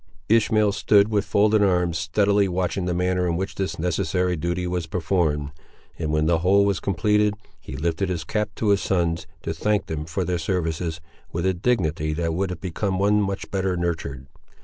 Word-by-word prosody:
Ishmael 110 -1 +3
stood, 100 +1 +3
with 105 -2 +1
folded 105 +2 +3
arms, 90 -4 +2
steadily 100 +5 +2
watching 90 +1 -1
the 90 - -1
manner 90 0 +1
in 85 - 0
which 95 +2 -3
this 95 -1 -3
necessary 90 +1 0
duty 85 +3 -2
was 90 -2 -2
performed, 80 -4 0 0.5
and 80 -2 -2
when 75 0 +2
the 80 0 +2
whole 100 +3 +4
was 100 -1 +1
completed, 105 +3 +1 0.2
he 65 - -9
lifted 85 +6 -1
his 85 -3 -2
cap 105 +4 -1
to 110 - 0
his 100 -1 +3
sons, 85 -3 0 0.2
to 80 - -2
thank 105 +4 0
them 75 -1 -4
for 85 +4 -2
their 90 -1 -1
services, 80 -2 -2 0.3
with 85 +2 -2
a 95 - +3
dignity 85 -7 0
that 80 +1 -1
would 95 +3 -1
have 90 -2 -6
become 95 +1 -2
one 105 +2 +3
much 100 -1 -3
better 95 -2 0
nurtured. 80 -7 -3
90 Hz, 190 wpm, -24 LUFS, 80-100 Hz, 0.5 s, whole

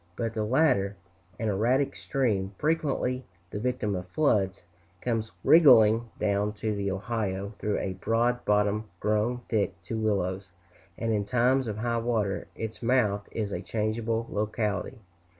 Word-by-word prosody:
But 115 -1 -2
the 110 -2 -1
latter, 105 -5 +2 0.4
an 110 - -2
erratic 120 +7 +1
stream, 100 -8 -1
frequently 140 -5 0 0.3
the 105 - -4
victim 115 -4 -1
of 90 0 -5
floods, 100 -6 +1 0.4
comes 115 -1 -2
wriggling 120 -8 +6
down 105 0 0
to 110 0 -2
the 100 -1 -1
Ohio 100 0 -3
through 105 -1 -1
a 95 - -2
broad 120 +6 0
bottom 105 +1 +2
grown 110 +4 0
thick 100 -4 0
to 110 +4 -4
willows, 95 -3 -1 0.5
and 115 -1 -1
in 105 -1 +1
times 125 +3 +2
of 105 -1 -3
high 115 +1 0
water 110 -4 -1
its 110 0 -5
mouth 115 -5 +1
is 105 -2 -3
a - - -3
changeable 115 +1 -1
locality. 105 -1 -2
110 Hz, 145 wpm, -28 LUFS, 100-120 Hz, 0.5 s, wriggling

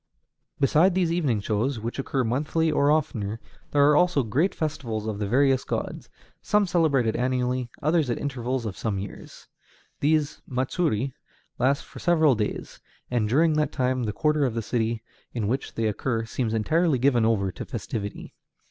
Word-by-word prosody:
Beside 155 +7 +4
these 180 -3 +2
evening 145 -11 +1
shows, 110 +5 -1
which 115 +4 -5
occur 135 -1 0
monthly 150 +7 0
or 140 -1 +3
oftener, 115 -9 0 0.3
there 145 -1 +4
are 150 - +5
also 175 -4 +3
great 140 - +1
festivals 120 -9 -3
of 110 -2 -3
the 105 - -1
various 135 +3 +3
gods, - - -4 0.3
some 210 -1 +2
celebrated 150 - +2
annually, 125 0 0
others 155 -2 +2
at 120 - 0
intervals 130 -3 -3
of 100 -3 -4
some 105 -3 -2
years. 100 +1 -8 0.5
These 150 0 +1
matsuri 130 - -1 0.5
last 135 +3 +2
for - - -12
several 160 -5 +4
days, 105 -3 -3 0.3
and 115 -4 +1
during 155 +6 +4
that 150 - +1
time 130 -1 0
the 105 - -1
quarter 150 +5 +1
of 125 -4 0
the 115 - -2
city 115 0 -1 0.3
in 110 -4 -2
which 130 +5 -2
they 115 - -1
occur 115 +2 -1
seems 115 0 -2
entirely 155 +7 +2
given 125 -2 +3
over 105 -4 +1
to - - -7
festivity. 100 -2 -5
130 Hz, 165 wpm, -25 LUFS, 115-150 Hz, 0.5 s, are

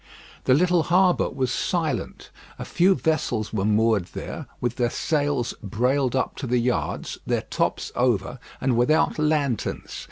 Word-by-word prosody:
The 130 - +5
little 175 +2 +3
harbour 180 +2 +3
was 130 -2 -2
silent. - - -2 0.3
A - - -6
few 190 +2 +3
vessels 155 -11 -1
were 100 -3 0
moored 110 -2 +2
there, - - -6
with 120 0 -2
their 120 -1 +1
sails 145 -4 -1
brailed 125 +5 0
up 130 - -1
to 135 - -4
the 125 +1 +1
yards, 120 +1 -2
their - - 0
tops - - -1
over, 125 0 0 0.2
and 130 -2 +1
without 155 +7 +2
lanterns. 150 -6 -1
130 Hz, 150 wpm, -24 LUFS, 120-155 Hz, 0.3 s, The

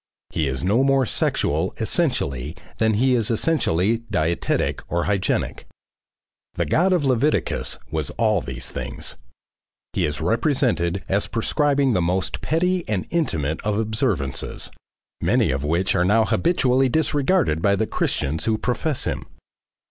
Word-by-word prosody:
He 75 - 0
is 65 +1 -2
no 105 +8 +3
more 135 -1 +3
sexual - - 0
essentially 70 +5 -1 0.2
than 110 -1 +3
he 130 +4 +3
is 115 -4 +2
essentially 115 - +1
dietetic 85 -4 0
or 85 0 +1
hygienic. 100 -2 -1 0.9
The - - 0
God 180 +4 +2
of 175 -6 +2
Leviticus 135 +3 +1
was 80 -3 -1
all 110 -5 +2
these - - -6
things. 65 -1 -5 0.8
He - - +1
is 75 -2 -3
represented 115 - +1
as 100 +2 0
prescribing 140 +4 +1
the 90 - +2
most 90 +2 -1
petty 180 +3 +1
and 100 -4 -1
intimate 80 - -1
of 105 -1 -1
observances 110 - -1 0.5
many - - +2
of 65 +1 -2
which 85 +5 +1
are 90 - +2
now 110 +4 +3
habitually 135 -6 +2
disregarded 145 - +1
by 100 +1 +3
the 110 - 0
Christians 75 -5 -1
who 110 -1 +1
profess 125 +5 -1
him. - - -3
110 Hz, 140 wpm, -22 LUFS, 85-135 Hz, 0.9 s, no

